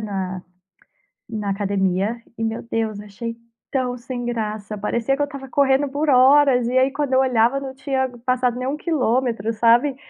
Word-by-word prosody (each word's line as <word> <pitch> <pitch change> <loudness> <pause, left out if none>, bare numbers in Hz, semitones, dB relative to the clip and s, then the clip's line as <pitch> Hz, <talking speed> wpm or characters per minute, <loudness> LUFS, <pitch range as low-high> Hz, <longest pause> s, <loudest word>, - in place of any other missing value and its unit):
na 190 -3 -4 0.9
na 215 -3 -4
academia. 195 +2 0
E, 225 - -3
meu 225 0 -2
Deus, 225 -2 -2
achei 210 +3 -6 0.4
tão 250 -2 -1
sem 245 0 -6
graça. 215 -3 -3
Parecia 235 +6 -1
que 290 - -1
eu - - +4
estava 275 -2 -8
correndo 275 +1 +2
por 290 +2 0
horas 260 -1 +5
e 255 - -1
aí 260 +1 +4
quando 280 -2 -1
eu 260 - +5
olhava 250 0 +3
não 265 -1 -6
tinha 265 -1 -1 0.2
passado 250 -1 +1
nem 255 +1 -3
1 290 - -1
quilômetro, 250 - 0
sabe? 240 +5 +3
245 Hz, 170 wpm, -22 LUFS, 220-265 Hz, 0.9 s, horas